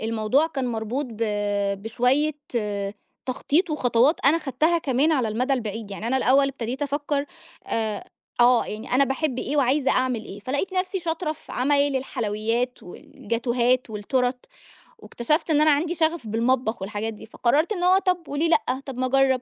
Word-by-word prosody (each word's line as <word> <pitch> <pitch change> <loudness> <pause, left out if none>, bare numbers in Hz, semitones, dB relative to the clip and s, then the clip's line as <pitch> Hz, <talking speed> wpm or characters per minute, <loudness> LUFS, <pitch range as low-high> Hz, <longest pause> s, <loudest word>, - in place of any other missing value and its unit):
الموضوع 225 +7 +1
كان 270 -5 -3
مربوط 235 +4 -2
ب 225 +1 -5 0.6
بشوية 250 +7 +1 0.9
تخطيط 300 +7 0
وخطوات 260 0 +2
أنا 300 +4 +5
خدتها 315 +3 +1
كمان 285 +2 +1
على 255 -7 +1
المدى 250 +6 0
البعيد، 220 -4 -3
يعني 205 +3 -5
أنا 260 +2 +1
الأوّل 275 +2 +4
ابتديت 255 +1 -4
أفكّر 290 0 -1 0.4
آآ 220 -2 -2 0.4
آه، 245 0 +5
يعني 215 +1 -7
أنا 275 +2 +5
باحِبّ 270 0 -2
إيه 290 +4 -2
وعايزة 275 +1 +2
أعمل 250 -4 0
إيه، 200 +1 -9
فلقيت 285 - -2
نَفْسي 370 +1 -1
شاطرة 325 -1 -2
في 315 - -14
عمايل 280 +1 +2
الحلويّات 235 -1 -2
والجاتوهات 235 +6 -1
والتُّورَت، 250 +4 -1 0.5
واكتشفت 305 - -1
إن 300 -1 +4
أنا 305 0 +5
عندي 320 +4 +1
شغف 320 -6 0
بالمطبخ 230 0 0
والحاجات 210 +3 -3
دي، 210 - -11
فقررت 285 - +1
إن 355 -2 -3
هو 370 +1 +5
طَب 365 -4 0
وليه 305 +4 0
لأ، 305 - +1
طَب 265 -3 -7
ما 255 - 0
أجرّب، 265 -1 +3
260 Hz, 160 wpm, -24 LUFS, 235-300 Hz, 0.9 s, أنا